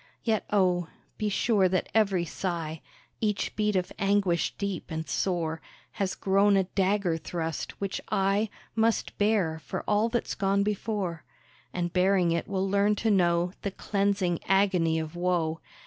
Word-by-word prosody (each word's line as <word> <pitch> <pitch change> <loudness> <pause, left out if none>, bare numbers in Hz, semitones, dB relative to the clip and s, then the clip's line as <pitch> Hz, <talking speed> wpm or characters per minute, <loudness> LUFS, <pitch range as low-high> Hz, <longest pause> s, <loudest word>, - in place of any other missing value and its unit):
Yet 220 -2 0
oh! 180 -4 +2 0.3
be 215 - 0
sure 200 -2 +2
that 185 0 0
every 195 -5 +2
sigh, 165 -3 -4 0.4
Each 210 -2 -1
beat 210 -1 +1
of 180 -1 0
anguish 195 -4 +1
deep 200 -3 -3
and 160 0 -4
sore, 165 -4 -1 0.3
Has 195 -2 -2
grown 200 +1 +3
a 190 - +3
dagger 190 -2 +1
thrust, 165 -1 -4
which 195 -1 -3
I 195 +3 +1 0.3
Must 225 0 +1
bear 200 -7 +2
for - - -4
all 210 +2 +2
that's 240 0 -1
gone 200 0 +1
before; 200 -5 -2 0.5
And 175 -1 -2
bearing 185 -1 +3
it 170 0 -1
will 195 -1 -1
learn 200 +2 +3
to 220 +2 +1
know 175 -2 +2
The 200 - -1
cleansing 195 -3 0
agony 185 -4 +3
of 160 +1 -4
woe. 175 -3 0
190 Hz, 150 wpm, -28 LUFS, 175-205 Hz, 0.5 s, grown